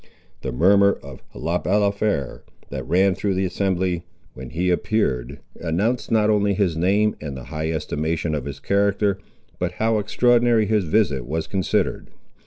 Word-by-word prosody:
The 65 - -3
murmur 100 +9 +4
of 70 -2 -10
Le 85 +3 -1
Balafré, 100 -7 0 0.3
that - - -5
ran 95 +3 +3
through 95 +2 -1
the 95 +1 0
assembly 90 -2 -1 0.3
when 65 -1 -9
he 90 +2 0
appeared, 70 - -1 0.2
announced 100 +9 -1
not 110 -2 +3
only 100 -1 +2
his 90 -4 +1
name 100 +5 +2
and 70 -3 -5
the 65 - -8
high 80 +1 -2
estimation 80 +1 -2
of 75 -3 -2
his 70 -2 -6
character, 100 0 +1 0.4
but 90 0 -2
how 110 +2 +1
extraordinary 120 +1 +3
his 105 -2 +1
visit 75 - +1
was 80 +2 -2
considered. 95 -2 -1
95 Hz, 155 wpm, -22 LUFS, 80-105 Hz, 0.4 s, murmur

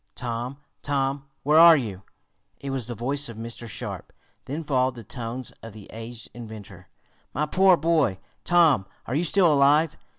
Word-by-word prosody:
"Tom! 120 +2 -4 0.2
Tom! 140 -1 -1 0.2
Where 150 +3 +5
are 165 -1 +9
you?" 105 -8 -5 0.6
It 140 - -5
was 130 -4 -3
the 120 - -5
voice 140 +4 -1
of 115 - -9
Mr. 115 +1 -4
Sharp. - - -6 0.3
Then 150 +5 -4
followed 130 -3 +1
the 120 - -9
tones 120 +3 -5
of 115 -2 -10
the 105 -2 -13
aged 115 +1 -8
inventor. 105 -6 -10 0.5
"My 150 - +1
poor 185 +3 +4
boy! 155 - +1 0.3
Tom, 160 - +4 0.2
are 120 - -5
you 155 +5 +1
still 175 -1 +4
alive?" 145 +3 +4
130 Hz, 165 wpm, -25 LUFS, 115-150 Hz, 0.6 s, are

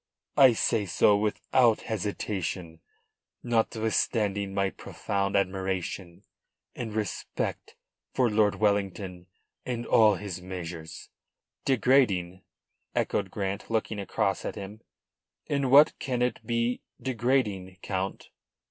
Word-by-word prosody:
"I 130 -3 +8
say 110 -2 +1
so 100 +3 +4
without 110 +3 +2
hesitation, 95 -5 -3 0.6
notwithstanding 110 -3 0
my 100 0 0
profound 100 -1 -3
admiration 95 -2 -2 0.5
and 115 -2 -4
respect 105 -2 -3 0.4
for 125 - +2
Lord 105 -2 +3
Wellington 100 -3 -1 0.4
and 120 -1 -3
all 110 -2 +5
his 95 -3 -6
measures." 85 -3 -7 0.6
"Degrading?" 110 -9 +2 0.5
echoed 100 -2 0
Grant, 100 +1 -4
looking 110 -1 -1
across 95 -1 -1
at - - -4
him. 100 +2 -8 0.6
"In 140 -2 0
what 145 +4 +7
can 125 -2 -1
it 125 - -1
be 115 +1 0 0.2
degrading, 115 -7 0
Count?" 95 0 -3
105 Hz, 105 wpm, -28 LUFS, 95-115 Hz, 0.6 s, I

